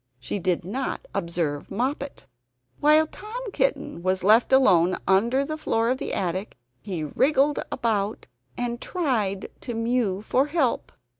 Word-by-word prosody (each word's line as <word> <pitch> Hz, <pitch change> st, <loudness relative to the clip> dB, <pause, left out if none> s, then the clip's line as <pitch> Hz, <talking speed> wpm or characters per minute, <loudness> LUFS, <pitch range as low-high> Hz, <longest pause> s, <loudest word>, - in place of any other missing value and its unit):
She 130 Hz, +10 st, -4 dB
did 180 Hz, -2 st, 0 dB
not 260 Hz, -, -3 dB
observe 170 Hz, -4 st, -2 dB
Moppet. 265 Hz, -, -3 dB, 0.5 s
While 305 Hz, +2 st, +5 dB
Tom 440 Hz, +7 st, -7 dB
Kitten -, -, -1 dB
was 185 Hz, +1 st, 0 dB
left 220 Hz, +6 st, +5 dB
alone 185 Hz, -10 st, +5 dB
under 235 Hz, +8 st, +3 dB
the 310 Hz, +1 st, -4 dB
floor 225 Hz, -5 st, +1 dB
of 260 Hz, -, -1 dB
the -, -, -4 dB
attic, 185 Hz, -, -3 dB, 0.2 s
he 180 Hz, -6 st, -4 dB
wriggled 285 Hz, -, +2 dB
about 215 Hz, -4 st, -1 dB, 0.3 s
and 240 Hz, -1 st, -3 dB
tried 220 Hz, -, -1 dB
to 240 Hz, -, -5 dB
mew 230 Hz, -4 st, 0 dB
for 265 Hz, +5 st, +2 dB
help. 295 Hz, -6 st, 0 dB
230 Hz, 140 wpm, -25 LUFS, 190-275 Hz, 0.5 s, While